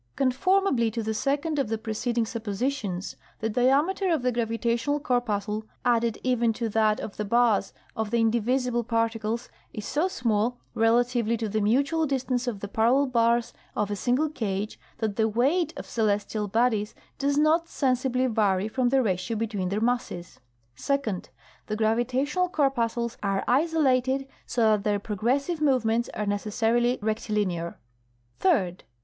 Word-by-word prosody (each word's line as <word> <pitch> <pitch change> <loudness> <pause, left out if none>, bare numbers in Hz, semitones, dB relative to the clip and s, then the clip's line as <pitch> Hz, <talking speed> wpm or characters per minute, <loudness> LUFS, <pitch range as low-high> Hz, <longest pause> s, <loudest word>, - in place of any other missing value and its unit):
Conformably 270 - +2
to 225 +1 -3
the 220 +1 -1
second 285 +5 -1
of 275 - 0
the 225 - 0
preceding 230 +1 -1
suppositions, 220 -3 -3 0.2
the 220 - -2
diameter 290 - +2
of 315 -6 +1
the 250 - +2
gravitational 235 +4 0
corpuscle 220 -6 -1 0.2
added 235 -2 +2
even 240 -3 +2
to 230 0 -3
that 215 0 +2
of 205 - -7
the 210 - -1
bars 230 0 +2 0.2
of 220 -1 -2
the 235 - +1
indivisible 240 +2 +1
particles 230 0 -1 0.3
is 215 -2 -6
so 305 +7 +1
small 235 - 0 0.2
relatively 235 0 +2
to 225 0 -2
the 215 +1 -1
mutual 280 +9 +2
distance 255 -2 -1
of 210 -5 -3
the 205 - -4
parallel 235 +7 +3
bars 235 -2 +2 0.2
of 210 0 -1
a - - 0
single 250 +9 +1
cage 210 -7 -3 0.2
that 220 -3 -2
the 220 -1 +3
weight 290 - +1
of - - -6
celestial 210 -1 -1
bodies 220 -1 +1 0.2
does 280 +1 +1
not 315 +3 +3
sensibly 255 -1 +1
vary 210 -5 +1
from 245 +2 0
the 265 0 +3
ratio 195 +2 -1
between 205 -5 -2
their 200 +2 -1
masses. 230 -7 -2 0.4
Second. 235 - -2 0.4
The 215 - -2
gravitational 255 - +1
corpuscles 240 -7 0
are 195 -1 0
isolated, 270 -2 +2 0.2
so 240 - -1
that 210 -2 +1
their 205 -1 +1
progressive 250 - -1
movements 235 -5 +2
are 210 - -2
necessarily 225 +4 +1
rectilinear. 210 -6 -1 0.6
Third. 195 - +1
235 Hz, 150 wpm, -26 LUFS, 215-260 Hz, 0.6 s, parallel